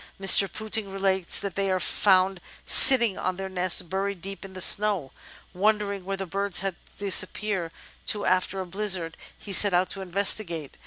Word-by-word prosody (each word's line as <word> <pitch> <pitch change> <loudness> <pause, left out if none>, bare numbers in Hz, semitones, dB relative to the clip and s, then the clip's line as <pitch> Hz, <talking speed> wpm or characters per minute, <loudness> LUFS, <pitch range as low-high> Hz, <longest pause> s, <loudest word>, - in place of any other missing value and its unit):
Mr. 195 0 +6
Pouting 220 -1 -4
relates 190 -2 -1
that 200 -2 -6
they 195 0 -3
are 185 0 -2
found 190 -1 0 0.2
sitting 235 -7 +6
on 185 - -4
their 190 +1 -7
nests 185 -1 +1
buried 195 +2 -5
deep 195 +1 -10
in 195 -1 -13
the 185 - -10
snow. 195 -6 +1 0.4
Wondering 200 0 -2
where 195 0 -5
the 195 - -6
birds 195 +1 -3
had 195 -1 -4 0.2
disappeared 195 -2 -1 0.4
to 205 -1 -1
after 185 +1 -2
a 190 - -6
blizzard, 185 -3 -3 0.2
he 200 - -7
set 200 -1 +6
out 180 +1 -1
to 195 - -5
investigate. 180 -4 -2
195 Hz, 170 wpm, -23 LUFS, 185-200 Hz, 0.4 s, Mr